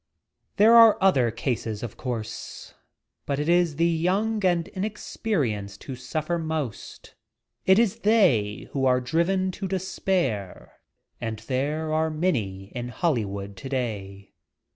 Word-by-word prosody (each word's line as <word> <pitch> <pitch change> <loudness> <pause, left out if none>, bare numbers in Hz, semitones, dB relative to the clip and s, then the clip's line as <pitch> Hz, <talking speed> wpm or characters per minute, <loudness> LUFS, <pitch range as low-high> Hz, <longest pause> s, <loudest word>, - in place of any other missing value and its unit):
There 220 +3 +6
are 230 -2 +8
other 140 -12 +4
cases, 115 -2 -3
of 120 - -6
course. 115 -4 -6 0.5
For 140 - 0
it 145 +2 -1
is 175 -3 +3
the 165 +3 +2
young 190 +6 +1
and 175 -3 +2
inexperienced 150 - -3
who 135 - -6
suffer 155 +7 -3
most. 155 -8 -5 0.5
It 190 0 +6
is 225 -4 +2
they 170 - +2
who 135 -1 +1
are 125 0 +4
driven 170 +8 0
to 190 +1 -5
despair, 180 - -2 0.4
and 115 -1 -3
there 150 +5 -1
are 160 +1 +1
many 110 - -2
in 120 0 -4
Hollywood 105 - -2
today. 100 -6 -5
150 Hz, 125 wpm, -25 LUFS, 115-185 Hz, 0.5 s, are